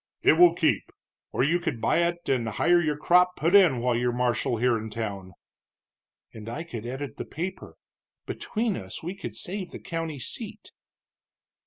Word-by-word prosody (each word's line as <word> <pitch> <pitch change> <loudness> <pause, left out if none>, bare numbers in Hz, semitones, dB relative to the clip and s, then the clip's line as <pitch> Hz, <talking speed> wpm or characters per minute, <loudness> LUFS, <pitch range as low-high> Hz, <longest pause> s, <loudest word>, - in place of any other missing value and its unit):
"It - - +7
will 170 +1 +6
keep. 160 -3 +1 0.4
Or - - +1
you 165 +5 +2
could 160 -9 -3
buy 115 - +2
it, 170 0 -1
and 125 -4 +1
hire 175 +10 +3
your 150 -3 0
crop 180 +3 +4
put 165 +4 0
in 175 -12 +6
while 125 -1 +1
you're 120 +1 +1
marshal 120 0 0
here 125 +1 +2
in 110 0 -4
town." 100 -4 -5 1.0
"And 110 0 -8
I 145 +8 -4
could 120 -9 -7
edit 130 0 -5
the - - -3
paper. 180 +5 -6 0.5
Between 220 -2 -2
us 95 +6 -7
we 175 +3 -3
could 195 - -7
save 185 -1 -5
the - - -9
county 165 -3 -4
seat." 125 - -6
150 Hz, 175 wpm, -26 LUFS, 120-175 Hz, 1.0 s, It